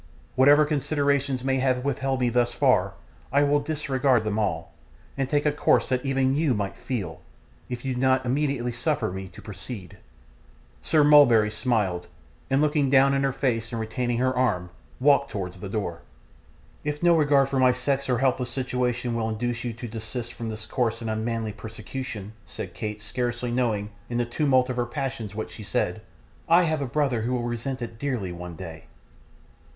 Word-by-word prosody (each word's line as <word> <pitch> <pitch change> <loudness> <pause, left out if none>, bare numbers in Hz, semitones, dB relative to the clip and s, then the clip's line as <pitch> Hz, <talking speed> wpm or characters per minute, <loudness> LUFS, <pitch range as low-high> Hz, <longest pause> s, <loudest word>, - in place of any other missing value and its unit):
Whatever 145 +3 +6
considerations 140 -3 0
may 135 0 +1
have 130 0 +1
withheld 135 -1 -1
me 125 - +3
thus 120 0 +1
far, - - +3 0.4
I 140 +2 +4
will 145 0 +3
disregard 140 -5 +1
them 105 0 -1
all, 105 - -2 0.4
and 135 -1 -1
take 145 0 +1
a 150 - +4
course 145 - +2
that 130 -1 0
even 135 -1 +1
YOU 145 -3 +2
might 100 -2 -3
feel, 95 - -4 0.5
if 125 +1 -5
you 130 - 0
do 125 - -3
not 130 0 +3
immediately 135 -2 0
suffer 120 - -1
me 95 +1 -6
to 90 - -13
proceed.' 105 -2 -8 0.8
Sir 155 -2 +3
Mulberry 130 -8 +6
smiled, 105 -6 0 0.4
and 135 - +3
still - - +3
looking 145 -3 +2
in 135 0 +5
her 135 0 +2
face 115 -4 -1
and 115 - -3
retaining 120 +2 -1
her 130 +1 +1
arm, 90 -9 0 0.3
walked 140 +1 +4
towards 95 -2 -5
the 100 - -6
door. 90 -5 -3 0.8
'If 150 +2 -3
no 175 -1 +6
regard 145 -3 +4
for 135 - 0
my 130 -1 +6
sex 135 +2 -1
or 125 - +3
helpless 130 -1 +1
situation 125 -1 -1
will 115 -1 -1
induce 115 +2 -2
you 120 - -2
to 120 +2 -7
desist 115 +2 -5
from 115 -1 -5
this 110 0 -6
coarse 115 -2 -1
and 115 -1 -2
unmanly 110 0 -2
persecution,' 110 0 -7
said 90 - -7
Kate, 105 +4 -5
scarcely 120 +1 -2
knowing, 110 -4 0 0.2
in 120 - -2
the 120 - +1
tumult 130 0 +2
of 130 -1 -4
her 120 -1 0
passions, 115 -5 -4
what 110 - -4
she - - -9
said, 100 - -1 0.5
'I 170 +2 +6
have 155 -3 0
a 140 - -1
brother 130 -3 0
who 120 +3 -1
will 125 -1 -1
resent 120 +2 -3
it 115 -1 -8
dearly, 125 -10 -2
one 90 -1 -7
day. 80 -3 -9
125 Hz, 185 wpm, -26 LUFS, 110-135 Hz, 0.8 s, Whatever